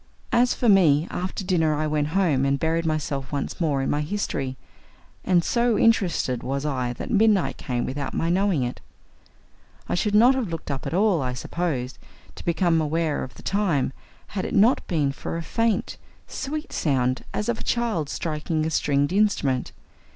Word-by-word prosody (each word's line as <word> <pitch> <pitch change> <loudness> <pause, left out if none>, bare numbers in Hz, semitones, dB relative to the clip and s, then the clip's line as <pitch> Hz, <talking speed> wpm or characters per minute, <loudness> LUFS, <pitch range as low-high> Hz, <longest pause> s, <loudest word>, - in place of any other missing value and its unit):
As 245 +1 +3
for 245 - 0
me, 170 -7 +5
after 185 +2 -3
dinner 165 -5 +2
I 155 +1 -1
went 150 -1 0
home 155 -9 +2
and 140 0 +2
buried 165 +1 0
myself 140 -3 -2
once 145 +4 -3
more 145 -5 +1
in - - -1
my 145 - 0
history, 150 -7 -3 0.7
and 175 -2 +3
so 235 +1 +2
interested 175 - +2
was 135 +2 -3
I 130 -4 -1
that 120 - -6
midnight 215 -3 +3
came 120 -2 -2
without 140 +1 -4
my 165 - 0
knowing 185 -6 +2
it. 120 0 -4 1.1
I - - -2
should 205 +4 +1
not 240 +5 +7
have 260 -4 -1
looked 165 -3 -5
up 135 -1 -4
at - - -2
all, 195 -4 +3
I 125 -1 -2
suppose, 130 -1 -3 0.3
to - - -11
become 170 -1 +2
aware 155 0 0
of 130 - -9
the - - -13
time, 185 -10 0 0.4
had 190 -2 -3
it - - -3
not 225 +6 +4
been 150 -6 +1
for 140 - -5
a 165 - -4
faint, 230 +4 -1 0.3
sweet 300 +3 -5
sound 130 -4 0
as 105 0 -2
of 115 - -1
a - - -6
child 225 -11 -1
striking 155 0 -2
a 160 - -1
stringed 145 +1 +1
instrument. 175 -11 +1
160 Hz, 180 wpm, -24 LUFS, 140-195 Hz, 1.1 s, not